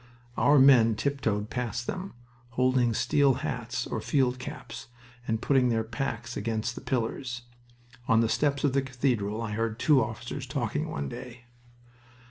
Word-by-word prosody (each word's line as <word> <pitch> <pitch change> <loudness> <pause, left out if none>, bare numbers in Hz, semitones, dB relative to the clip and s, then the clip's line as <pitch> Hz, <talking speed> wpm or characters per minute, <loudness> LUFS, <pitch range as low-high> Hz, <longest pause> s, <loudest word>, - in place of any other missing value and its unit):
Our 145 +4 +4
men 125 -5 +6
tiptoed 110 -6 -1
past 120 -1 -3
them, 185 -1 -5 0.4
holding 125 -1 +3
steel 140 +1 +3
hats - - -3
or - - -3
field 130 -3 +1
caps, 125 -2 -8 0.4
and 110 0 -1
putting 130 -3 +3
their 115 -1 +1
packs 115 0 -4
against 110 +2 -2
the - - -8
pillars. 120 0 -2 0.6
On 115 - +4
the 115 - +3
steps 140 +3 0
of 140 -3 +2
the 140 - +3
cathedral 120 -5 -1
I 110 - -4
heard 115 0 -2
two 140 +1 +4
officers 120 +4 -6
talking 140 +3 -2
one 70 -1 -3
day. 125 - -9
125 Hz, 150 wpm, -28 LUFS, 115-135 Hz, 0.6 s, men